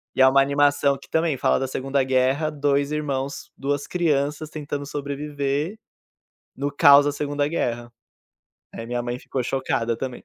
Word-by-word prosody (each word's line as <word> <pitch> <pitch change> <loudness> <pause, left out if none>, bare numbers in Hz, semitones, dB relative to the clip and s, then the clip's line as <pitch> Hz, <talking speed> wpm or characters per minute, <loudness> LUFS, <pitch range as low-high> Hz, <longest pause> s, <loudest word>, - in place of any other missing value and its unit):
e - - +2
é - - +8
uma 135 +1 +5
animação 140 0 +2
que 135 - -16
também 160 -4 0
fala - - +2
da 135 - -2
segunda 135 +1 -1
guerra, 130 +4 +1
2 145 -1 0
irmãos, 140 -2 -3
2 145 +1 -2
crianças 150 -3 -1
tentando 145 -2 -5
sobreviver 145 +4 -3 0.8
no 140 +2 -2
caos 140 0 +7
da 145 - 0
segunda 145 0 -1
guerra. 120 -6 -2 0.8
Aí 115 - -7
minha 120 +1 -2
mãe 120 0 -4
ficou 130 0 -4
chocada 120 -2 -1
também. 130 0 -6
140 Hz, 160 wpm, -23 LUFS, 130-145 Hz, 0.8 s, é